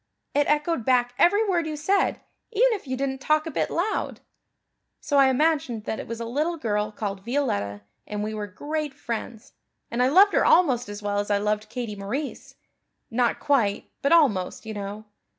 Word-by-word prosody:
It 290 0 +2
echoed 300 -2 +1
back 245 0 +2
every 410 +5 +4
word 345 -4 +1
you 310 - -3
said, 380 +7 +1 0.3
even 475 +4 +4
if 395 -9 -6
you 260 0 -2
didn't 265 0 -2
talk 305 +2 +2
a 325 - -4
bit - - -1
loud. 385 +6 -2 0.8
So 285 -2 +1
I 270 - +7
imagined 265 -5 +1
that 220 - -3
it - - -7
was 230 0 -5
a 230 - -4
little 305 +8 -1
girl 210 -6 -1
called 200 -2 -5
Violetta 100 - -1 0.3
and 210 0 -3
we 215 +1 -3
were 210 -1 -4
great 295 +7 -4
friends 230 -3 -6 0.4
and 235 +1 0
I 250 - +4
loved 390 +9 +6
her - - +4
almost 255 - +4
as 205 0 -7
well 205 0 0
as 205 - -3
I 205 - +3
loved 210 +1 -1
Katie 235 -4 -4
Maurice 230 +9 -5 0.6
not 240 +1 +1
quite, 235 -9 +1
but 280 - +1
almost, 235 - +3
you 220 - -5
know. 205 +1 -6
250 Hz, 190 wpm, -25 LUFS, 210-305 Hz, 0.8 s, I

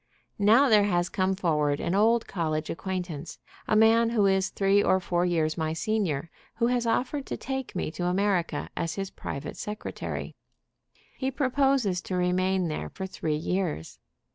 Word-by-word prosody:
Now 225 +7 +6
there 210 -4 +5
has 175 -3 +1
come 190 0 0
forward 150 -6 +1
an 170 - -1
old 225 +3 +3
college 155 -4 -2
acquaintance, 180 -4 -5 0.3
a - - +2
man 225 +1 +5
who 220 -3 +2
is 190 -1 +2
three 195 +1 +3
or 190 - +3
four 175 -1 0
years 165 -2 0
my 160 0 -1
senior, 170 -5 -1 0.2
who 235 - +1
has 240 -1 +1
offered 265 +5 -1
to - - -4
take 265 -4 -5
me 180 - -2
to 175 +2 -4
America 185 -1 0
as 165 -1 -2
his 195 -1 -4
private 140 +2 -6
secretary. 210 +1 -5 0.8
He 265 - 0
proposes 265 - +1
to 185 - -4
remain 180 +1 +1
there 155 - -4
for 190 - -6
three 160 -4 -2
years. 160 - -2
190 Hz, 165 wpm, -27 LUFS, 170-220 Hz, 0.8 s, Now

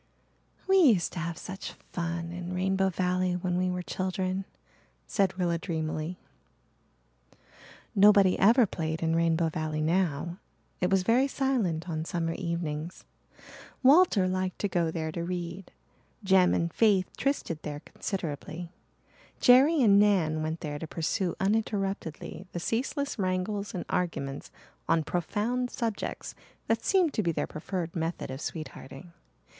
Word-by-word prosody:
"We 385 0 +5
used 235 - +4
to 180 - -4
have 170 -1 -3
such 190 +1 -7 0.2
fun 170 -1 -3
in 175 +1 -5
Rainbow 190 +1 +1
Valley 180 0 0
when 180 0 -1
we 185 +1 +1
were 180 0 -3
children," 185 +1 -2 0.6
said 190 -2 0
Rilla 170 -2 0
dreamily. 160 0 -3 1.8
Nobody 200 -2 +6
ever 230 +5 +6
played 160 -3 -3
in 165 0 +1
Rainbow 165 0 +2
Valley 155 -1 -3
now. 170 0 0 0.4
It 180 - +1
was 195 -1 +3
very 245 +7 +3
silent 235 - 0
on 160 -2 -2
summer 165 -1 -2
evenings. 170 -1 -4 0.8
Walter 270 - +6
liked 185 0 -1
to 205 - +1
go 175 -4 0
there 160 -1 -3
to 170 +2 -4
read. 175 +1 -5 0.5
Jem 190 -2 +4
and 170 0 -1
Faith 200 -5 +3
trysted 225 - -1
there 150 -1 -6
considerably; 170 -1 -5 0.7
Jerry 270 +4 +6
and 200 -3 +6
Nan 175 -7 +3
went 160 +1 -3
there 145 -1 -4
to 160 - -6
pursue 170 +3 -1
uninterruptedly 195 -4 -2
the 175 - -3
ceaseless 265 - -2
wrangles 190 +2 -1
and 180 - -4
arguments 140 -6 -2 0.4
on 165 -1 +3
profound 215 +10 -1
subjects 230 -5 -4 0.3
that 225 0 0
seemed 365 -6 +3
to - - +1
be 170 -4 +1
their - - -1
preferred 170 +1 -5
method 165 -3 -3
of 130 +2 -6
sweethearting. 155 0 -7
180 Hz, 140 wpm, -28 LUFS, 165-200 Hz, 1.8 s, Nobody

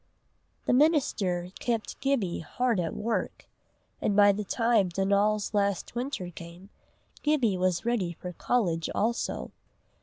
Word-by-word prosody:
The - - +2
minister 220 - +2
kept 230 -2 -2
Gibbie 265 -11 0
hard 235 +5 0
at 165 -2 -2
work, 225 +2 -2 0.6
and 205 - +1
by 205 0 +7
the 205 +1 -3
time 225 -2 +2
Donal's 200 +3 +1
last 200 -2 0
winter 240 -7 -3
came, 170 +4 -11 0.5
Gibbie 270 -10 +2
was 185 +1 0
ready 225 -8 0
for 180 +2 -8
college 170 -6 0
also. 235 +3 -1
205 Hz, 125 wpm, -28 LUFS, 180-235 Hz, 0.6 s, by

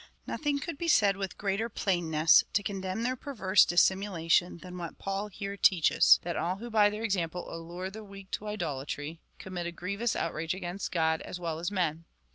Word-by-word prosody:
Nothing 295 -2 -1
could 285 +1 -5
be 340 - -2
said 205 -10 +4
with 195 -1 -5
greater 205 +3 -1
plainness 165 -7 +3
to 205 - +2
condemn 195 +2 -3
their 255 +2 0
perverse 210 -8 +3
dis 175 0 +5
simulation 180 -3 +1
than 180 0 -10
what 170 -1 -6
Paul 195 +1 -3
here 200 0 -6
teaches 185 -4 +5
— - - -34
that 175 0 -3
all 180 +2 -1
who 235 +4 -8
by 210 -2 +5
their 210 +2 -5
example 180 -5 -2
allure 175 +3 -6
the 220 +2 -9
weak 195 -1 -12
to 215 - -4
idolatry, 155 -5 -4 0.2
commit 180 -2 -5
a - - -4
grievous 200 +7 -2
outrage 165 +1 -2
against 185 +1 -5
God 160 -2 +1
as 180 - -7
well 165 -2 -3
as 175 - -2
men. 170 -5 -1
190 Hz, 195 wpm, -30 LUFS, 170-205 Hz, 0.2 s, dis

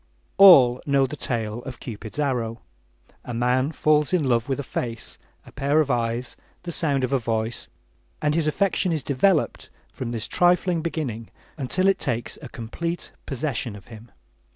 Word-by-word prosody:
All 135 -11 +8
know 140 -1 +3
the 140 - -5
tale 115 -4 -3
of 125 -1 -8
Cupid's 110 0 -8
arrow. 120 -6 -1 0.6
A 125 - -6
man 125 +4 +1
falls 150 0 +2
in 180 -4 +3
love 120 -2 +1
with 135 - -1
a - - -2
face, 115 -2 -5 0.3
a - - -14
pair 145 +2 +1
of 145 -3 +2
eyes, 120 +1 -1 0.3
the 175 - -5
sound 145 -5 +1
of 130 +2 -1
a 135 - +3
voice, 115 -1 -2 0.5
and 150 -1 +1
his 160 -1 0
affection 185 +2 +1
is 155 -3 -1
developed 155 +5 +1 0.2
from 120 -2 -5
this 115 -2 -3
trifling 175 -1 +2
beginning 135 -9 -4 0.3
until 160 +7 0
it 195 - +3
takes 120 -3 -3
complete 170 +10 -5 0.2
possession 130 -5 -3
of 100 - -14
him. 115 +1 -12
130 Hz, 165 wpm, -24 LUFS, 115-155 Hz, 0.6 s, All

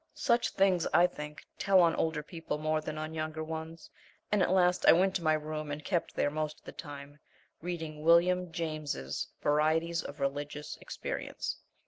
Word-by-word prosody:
Such 235 -2 +2
things, 190 -3 +2
I 175 - +7
think, 150 -3 -6
tell 195 -1 +5
on 170 -2 +5
older 160 -2 0
people 165 -1 -4
more 155 0 0
than 155 0 -5
on 155 +1 -4
younger 155 0 -3
ones, 160 +1 -7 0.4
and 210 -2 +3
at - - +3
last 180 -1 +3
I - - +10
went 185 +3 +3
to 175 - -10
my 155 -1 +4
room 155 0 -3
and 145 +1 -5
kept 175 -4 -1
there 145 - +1
most 155 0 -2
of - - -25
the - - -7
time, 145 -1 -9 0.4
reading 160 -3 -5
William 175 +2 +4
James's 155 - -3 0.2
Varieties 160 +3 +2
of 145 - -8
Religious 145 +2 -3
Experience. - - -4
155 Hz, 175 wpm, -31 LUFS, 150-170 Hz, 0.4 s, I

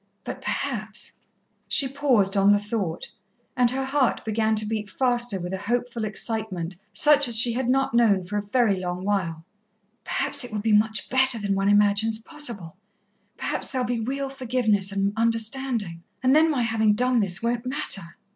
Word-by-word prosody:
But - - -7
perhaps 220 -5 -3 0.2
" - - -46
She 275 - +1
paused 255 -8 +1
on 200 0 +5
the - - +4
thought, 205 -5 -3 0.4
and 245 -1 +3
her 265 +2 -2
heart 270 -1 0
began 220 0 +1
to 215 0 +2
beat 210 -1 -3
faster 240 -2 0
with 180 +1 -5
a 190 - -3
hopeful 235 +2 -2
excitement 205 -5 -3 0.2
such 290 +5 +4
as 235 -2 +3
she 235 0 +4
had 250 +1 -1
not 270 -1 +1
known 220 -6 +3
for 190 +4 -6
a - - 0
very 205 -1 +1
long 180 0 -4
while. 170 -6 -2 0.6
"Perhaps 280 0 0
it 245 - -7
will 215 - -3
be 215 +1 +1
much 215 +1 +2
better 260 -1 +3
than 200 -2 -1
one 195 +1 +1
imagines 205 +2 +3
possible. 225 - -4 0.6
Perhaps - - -1
there'll 255 -2 -1
be 240 -1 -2
real 275 +4 -3
forgiveness 225 -7 0
and 200 0 0
understanding 230 -4 -1 0.2
and 260 +2 +4
then 320 +1 +5
my 270 -6 0
having 220 -2 +2
done 250 +2 +2
this 190 -1 -2
won't 235 +1 -1
matter. 215 - -2
225 Hz, 180 wpm, -24 LUFS, 200-250 Hz, 0.6 s, on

